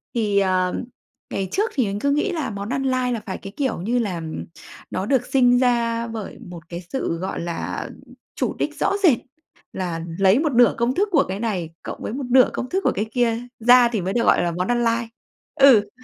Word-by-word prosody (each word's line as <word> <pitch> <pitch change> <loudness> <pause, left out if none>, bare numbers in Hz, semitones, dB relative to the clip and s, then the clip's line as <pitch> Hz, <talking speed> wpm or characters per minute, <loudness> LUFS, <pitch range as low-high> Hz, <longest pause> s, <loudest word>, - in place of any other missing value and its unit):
thì, 210 -3 +2
ờ, 185 -2 +1 0.6
ngày 195 - -2
trước 425 +5 0
thì 260 -5 +1
mình 200 0 -3
cứ 280 +3 +1
nghĩ 300 +7 +1
là 320 -4 -2
món 200 0 -5
ăn 270 +2 -1
lai 255 -2 0
là 230 - -2
phải, 190 - -4
cái 195 0 -10
kiểu, 265 - -1
như 240 +5 0
là 190 -7 -2 0.7
nó 190 - -2
được 250 +1 +1
sinh 245 -2 +4
ra 235 -2 +1
bởi 225 -3 -7
một 175 -1 -9
cái 175 0 -6
sự, 265 -10 -2
gọi 185 +3 -4
là, 170 0 -4 0.5
chủ - - -1
đích - - -2
rõ - - +2
rệt, 300 -10 +6 0.6
là 175 -3 -3 0.2
lấy 195 +5 +5
một 310 -1 +1
nửa 240 0 +5
công 235 +2 0
thức 405 +2 +1
của 295 -5 +4
cái 190 +2 -4
này 195 -8 -2
cộng - - -7
với - - -4
một 270 +1 -4
nửa 255 0 +6
công 255 - -4
thức 380 - 0
của - - +3
cái 210 - -1
kia 235 -2 +1 0.2
ra 245 +1 +6
thì 225 -4 -2
mới 185 +2 -2
được 235 - +1
gọi - - +4
là 175 - 0
món 180 +2 -2
ăn 240 0 +1
lai. 230 0 0 0.5
Ừ, 245 -7 +6
230 Hz, 225 wpm, -22 LUFS, 195-255 Hz, 0.7 s, rệt